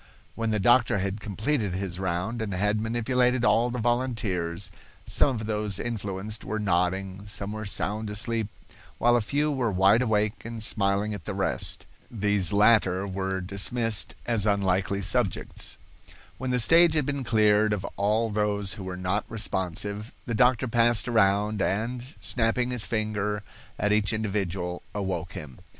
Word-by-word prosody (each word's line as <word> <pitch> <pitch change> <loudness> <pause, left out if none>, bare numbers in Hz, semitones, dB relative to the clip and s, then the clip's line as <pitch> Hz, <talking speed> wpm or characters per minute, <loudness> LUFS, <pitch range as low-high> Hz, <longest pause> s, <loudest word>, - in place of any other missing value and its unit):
When 115 -1 -2
the 105 -1 +1
doctor 120 +1 +4
had 100 +2 -2
completed 105 -1 -1
his 95 -2 -3
round 95 +5 -2
and 100 -4 -3
had 105 +3 +1
manipulated 125 +2 +1
all 120 0 +3
the 125 - -4
volunteers, 110 -8 -1 0.3
some 135 - +3
of 110 -1 -4
those 105 -2 0
influenced 105 -2 -4
were 110 +2 -3
nodding, 95 0 -1
some 105 -1 -3
were 110 0 -5
sound 105 +2 -1
asleep, 110 +1 -1 0.5
while 120 0 +4
a 120 - +3
few 145 +7 0
were 125 -6 0
wide 95 +5 +4
awake 110 -3 0
and 115 -1 -5
smiling 100 0 +1
at 95 -6 -8
the - - -4
rest. - - -2 0.2
These 100 -5 0
latter 100 -3 +4
were 95 -1 -2
dismissed 100 +3 0
as 110 -3 +1
unlikely 100 0 +1
subjects. 100 -1 -1 0.6
When 130 +1 -3
the 125 0 +1
stage 165 +6 +5
had 150 -3 +2
been 140 -1 -2
cleared 110 -2 +3
of 100 -2 -2
all 110 +3 +1
those 105 -1 0
who 100 - -8
were 90 -1 -5
not 90 +3 0
responsive, 105 +1 -2
the 120 - -3
doctor 125 +2 +3
passed 115 -1 +3
around, 105 -2 +2
and, 120 +7 -2
snapping 120 +1 0
his 125 -3 -2
finger 105 -2 -1 0.3
at 105 - 0
each 105 -2 +1
individual, 95 -5 -2
awoke 95 -4 -3
him. 70 -5 -9
105 Hz, 155 wpm, -26 LUFS, 100-115 Hz, 0.6 s, stage